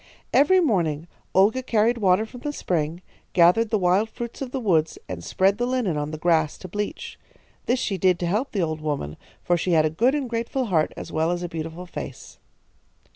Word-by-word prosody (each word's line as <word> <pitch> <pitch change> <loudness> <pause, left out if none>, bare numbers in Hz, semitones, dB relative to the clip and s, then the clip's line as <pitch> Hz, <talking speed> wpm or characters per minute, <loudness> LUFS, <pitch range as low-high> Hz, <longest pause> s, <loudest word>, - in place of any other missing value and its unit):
"Every 370 +7 +5
morning 170 - +1 0.3
Olga 205 +7 +4
carried 235 -1 +1
water 195 +1 +3
from 245 +2 -12
the 295 - -3
spring, 170 - -2 0.3
gathered 180 +6 +5
the 220 - +2
wild 190 +3 +2
fruits 235 +2 -7
of 265 - -3
the 265 - -3
woods, 165 -9 +1
and 85 -2 -6
spread 195 - +1
the 245 - 0
linen 250 -10 0
on 150 0 -2
the 155 - -5
grass 160 -2 +1
to 185 - -9
bleach. 205 +3 -5 0.5
This 245 - +2
she 195 -5 -2
did 185 -1 +3
to 175 - -3
help 210 +10 -1
the 195 -4 0
old 155 -1 -3
woman, 145 - -3 0.3
for 175 - +2
she 175 +1 0
had 155 -1 +4
a 155 - 0
good 240 - +2
and 285 -3 -2
grateful 235 +3 -2
heart 165 -8 +1
as - - -7
well 160 +1 +1
as 175 0 -2
a - - -2
beautiful 165 +2 -6
face. 175 - -8
185 Hz, 210 wpm, -24 LUFS, 160-230 Hz, 0.5 s, Every